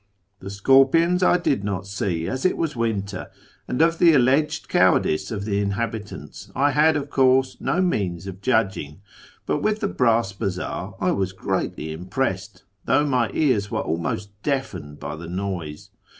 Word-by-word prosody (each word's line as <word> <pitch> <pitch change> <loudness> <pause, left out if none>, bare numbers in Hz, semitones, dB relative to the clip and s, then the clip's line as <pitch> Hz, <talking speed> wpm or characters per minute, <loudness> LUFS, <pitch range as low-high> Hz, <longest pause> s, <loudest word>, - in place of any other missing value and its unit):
" 100 +2 -48
The 95 - -8
scorpions 135 - +4
I 180 - +5
did 140 - 0
not 100 -2 -3
see, 95 -4 -2
as 130 0 -3
it 185 - +2
was 155 -4 -2
winter; 100 -5 -2 0.4
and 125 +6 +2
of 165 0 +2
the 170 -2 +6
alleged 145 +5 +2
cowardice 90 -1 +2
of 100 -2 -4
the 100 -2 0
inhabitants 100 -6 -5
I 145 +1 +3
had, 155 +2 +4
of 145 0 -5
course, 130 0 +3
no 185 - 0
means 95 - -1
of 95 -1 -8
judging; 95 - 0 0.4
but 150 - -1
with 215 +5 0
the 205 - 0
brass 115 - +1
bazaar 95 -3 -4
I - - +1
was 95 -1 -1
greatly 80 -4 -3
impressed, 95 +3 -3 0.2
tliough 150 - +3
my 125 -4 +1
ears 120 -10 +2
were - - -1
almost 85 +5 -3
deafened 95 - -3
by 75 +2 -5
the 80 +1 -9
noise. 90 -4 -5
105 Hz, 165 wpm, -23 LUFS, 95-135 Hz, 0.4 s, the